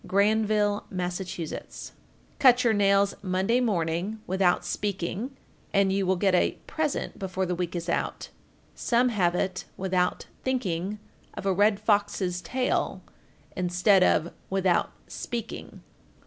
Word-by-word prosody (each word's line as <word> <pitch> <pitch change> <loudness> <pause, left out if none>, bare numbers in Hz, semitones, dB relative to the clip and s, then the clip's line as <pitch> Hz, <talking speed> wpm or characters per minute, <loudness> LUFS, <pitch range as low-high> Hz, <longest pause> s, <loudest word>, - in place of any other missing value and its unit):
Granville, 210 +1 +2
Mass. 180 -1 -3
1437. 175 -4 -6 0.4
Cut 250 -2 +6
your 230 -2 +4
nails 200 -1 +3
Monday 190 +5 +1
morning, 185 -1 -1
without 185 -1 +2
speaking 205 +6 -3 0.2
(?), - - -33
and 195 -1 +4
you 195 -1 0
will 190 - +3
get 190 +1 +2
a 180 - +3
present 310 -2 -2
before 190 -1 -2
the 180 - -1
week 175 0 -3
is 170 0 -4
out; - - -2 0.4
some 245 +1 +2
have 180 -6 +1
it, 185 0 -2
"without 185 -1 0 0.2
thinking 205 -6 -1 0.4
of - - -6
a 195 - +3
red 205 +2 +3
fox's 205 -4 +1
tail," 255 +4 -1 0.5
instead 180 +2 +3
of 170 -1 +3 0.2
"without 190 -2 +2 0.2
speaking." 230 -2 -6
195 Hz, 135 wpm, -27 LUFS, 180-215 Hz, 0.5 s, Cut